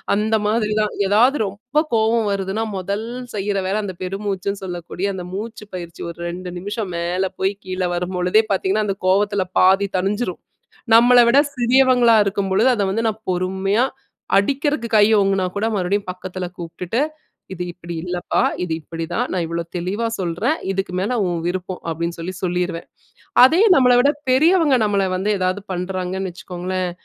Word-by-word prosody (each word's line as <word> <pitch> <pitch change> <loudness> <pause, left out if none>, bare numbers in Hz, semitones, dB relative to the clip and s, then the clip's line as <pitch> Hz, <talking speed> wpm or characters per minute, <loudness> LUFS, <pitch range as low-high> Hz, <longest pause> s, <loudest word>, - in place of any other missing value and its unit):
அந்த 220 +2 +1
மாதிரிதான். 215 -1 0
எதாவது 245 +8 +4
ரொம்ப 245 +10 -1
கோவம் 225 0 +2
வருதுன்னா 195 +3 -2
மொதல் 200 +4 -3 0.3
செய்ற 200 0 -1
வேல 210 +3 0
அந்த 185 -2 -6
பெருமூச்சுன்னு 195 +1 -3
சொல்லக்கூடிய 180 +2 -4
அந்த 180 -2 -6
மூச்சு 215 +2 -6
பயிற்சி 170 -2 -8
ஒரு 170 - -9
2 180 +1 -6
நிமிஷம் 205 0 -4
மேல 175 +2 -1
போய் 190 +1 +1
கீழ 185 0 -4
வரும் 180 +1 -3
பொழுதே 180 +5 +3
பார்த்தீங்கன்னா 200 +2 +1
அந்த 195 -1 -2
கோவத்துல 200 +1 +2 0.2
பாதி 190 +2 +5
தணிஞ்சிரும். 195 0 -2 0.5
நம்மள 245 +1 +7
விட 240 +4 +4 0.2
சிறியவங்களா 245 -1 +4
இருக்கும் 200 -1 -1
பொழுது 190 - +4
அத 205 - 0
வந்து 225 +3 -1
நான் 220 0 -3
பொறுமையா 190 +5 0 0.5
அடிக்கறதுக்கு 270 +1 0
கைய 210 +1 +5
ஓங்குனா 195 -1 +1
கூட, 205 - 0
மறுபடியும் 200 +1 0
பக்கத்துல 180 0 -5
கூப்டுட்டு, 175 +6 -4 0.5
இது 180 -1 -4
இப்டி 170 -1 -8
இல்லப்பா, 180 0 -1 0.2
இது 165 -3 -2
இப்டித்தான், 165 +10 -3
நான் 180 -2 -1
இவ்வளோ 170 0 -3
தெளிவா 195 +6 -2
சொல்றேன், 190 - 0 0.2
இதுக்கு 195 -1 -3
மேல 210 +6 -1
உன் 175 -2 -1
விருப்பம் 185 0 -4
அப்டின்னு 170 +1 -3
சொல்லி 180 +3 -4
சொல்லிருவேன். 180 -1 -2 0.6
அதே 320 +8 +5
நம்மள 250 -3 +5
விட 280 +3 +4 0.2
பெரியவங்க 310 +1 +4
நம்மள 200 -2 +1
வந்து 195 +3 -1
எதாவது 185 +2 -1
பண்றாங்கன்னு 185 +1 -3
வச்சுக்கோங்களேன் 180 +1 -4
195 Hz, 155 wpm, -20 LUFS, 180-220 Hz, 0.6 s, நம்மள